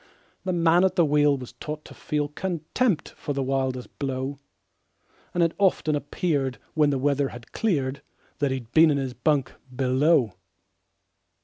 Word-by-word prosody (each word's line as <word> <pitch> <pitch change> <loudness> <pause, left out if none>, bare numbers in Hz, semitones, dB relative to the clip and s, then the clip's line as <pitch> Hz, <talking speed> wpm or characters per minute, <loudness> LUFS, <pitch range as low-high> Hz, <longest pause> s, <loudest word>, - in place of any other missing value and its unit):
The 185 - 0
man 170 0 +4
at 190 -1 +2
the 170 - +4
wheel 145 -1 +3
was 125 -2 -9
taught 150 0 -7
to - - -11
feel 150 -2 -2
Contempt 175 - -1
for 145 - -5
the 135 -1 -1
wildest 130 -1 -2
blow, 135 0 -3 0.9
And 175 - +2
it 165 -1 +2
often 180 -6 +2
appeared, 145 -2 -1 0.2
when 150 -2 +3
the 140 - +1
weather 140 +1 +1
had 120 -1 -11
cleared, 140 -10 -1 0.4
That 145 -2 +2
he'd 130 -3 -4
been 160 +3 +6
in 145 - +2
his 135 -2 -2
bunk 145 0 +1 0.2
below. 130 - +3
145 Hz, 155 wpm, -25 LUFS, 135-165 Hz, 0.9 s, been